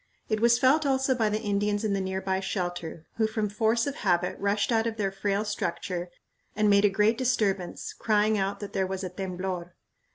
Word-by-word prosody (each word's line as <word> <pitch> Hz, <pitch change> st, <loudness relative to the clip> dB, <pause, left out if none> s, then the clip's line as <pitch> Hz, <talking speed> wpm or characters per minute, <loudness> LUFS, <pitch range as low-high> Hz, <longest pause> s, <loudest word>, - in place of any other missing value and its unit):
It 215 Hz, -1 st, +1 dB
was 235 Hz, +1 st, +5 dB
felt 275 Hz, +6 st, +4 dB
also 265 Hz, -1 st, +2 dB
by 225 Hz, -4 st, +1 dB
the 210 Hz, +1 st, -1 dB
Indians 205 Hz, 0 st, 0 dB
in 210 Hz, -2 st, 0 dB
the 195 Hz, -, 0 dB
near 190 Hz, 0 st, -2 dB
by 190 Hz, 0 st, 0 dB
shelter, 175 Hz, -4 st, -4 dB
who 220 Hz, -1 st, +3 dB
from 220 Hz, -1 st, -2 dB
force 220 Hz, +2 st, +1 dB
of 280 Hz, -, -3 dB
habit 180 Hz, -2 st, +1 dB
rushed 200 Hz, +3 st, +1 dB
out 225 Hz, 0 st, +2 dB
of 225 Hz, -1 st, -3 dB
their 195 Hz, -3 st, 0 dB
frail 200 Hz, +2 st, -1 dB
structure 180 Hz, -3 st, -3 dB, 0.5 s
and 210 Hz, -1 st, +3 dB
made 200 Hz, +1 st, +5 dB
a -, -, +6 dB
great 210 Hz, +4 st, +2 dB
disturbance, 200 Hz, -8 st, -1 dB
crying 215 Hz, 0 st, +2 dB
out 195 Hz, 0 st, -1 dB
that 205 Hz, -, -7 dB
there 190 Hz, -1 st, 0 dB
was 190 Hz, 0 st, -4 dB
a 185 Hz, -, -3 dB
temblor. 185 Hz, -1 st, -5 dB
205 Hz, 205 wpm, -27 LUFS, 190-220 Hz, 0.5 s, a